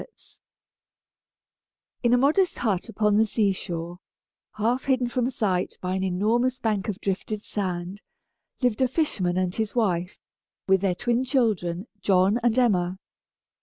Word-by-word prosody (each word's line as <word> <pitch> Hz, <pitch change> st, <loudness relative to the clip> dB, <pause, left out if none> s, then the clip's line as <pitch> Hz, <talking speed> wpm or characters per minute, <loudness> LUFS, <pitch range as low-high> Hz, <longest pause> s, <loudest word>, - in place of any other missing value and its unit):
] -, -, -67 dB
In 240 Hz, -, +2 dB
a 245 Hz, -, +5 dB
modest 310 Hz, +8 st, +2 dB
hut 210 Hz, -2 st, -1 dB
upon 210 Hz, -1 st, +2 dB
the 220 Hz, -, +5 dB
sea 210 Hz, -2 st, +2 dB
shore, 175 Hz, -1 st, -5 dB, 0.5 s
half 235 Hz, +5 st, 0 dB
hidden 260 Hz, -3 st, +2 dB
from 245 Hz, 0 st, 0 dB
sight 190 Hz, -7 st, -1 dB
by 180 Hz, 0 st, -3 dB
an 190 Hz, 0 st, -1 dB
enormous 225 Hz, +7 st, +1 dB
bank 215 Hz, -5 st, -1 dB
of 205 Hz, 0 st, -4 dB
drifted 205 Hz, +2 st, -3 dB
sand, 185 Hz, 0 st, -4 dB, 0.6 s
lived 245 Hz, -1 st, +1 dB
a 260 Hz, -, +4 dB
fisherman 215 Hz, -, -1 dB
and 185 Hz, -1 st, 0 dB
his 220 Hz, +1 st, -3 dB
wife, 180 Hz, -6 st, 0 dB, 0.5 s
with 190 Hz, -1 st, +4 dB
their 190 Hz, -3 st, +1 dB
twin 240 Hz, +4 st, 0 dB
children, 215 Hz, -9 st, 0 dB, 0.2 s
John 195 Hz, +4 st, +3 dB
and 240 Hz, 0 st, +2 dB
Emma. 185 Hz, -7 st, +2 dB
210 Hz, 145 wpm, -25 LUFS, 185-240 Hz, 0.6 s, a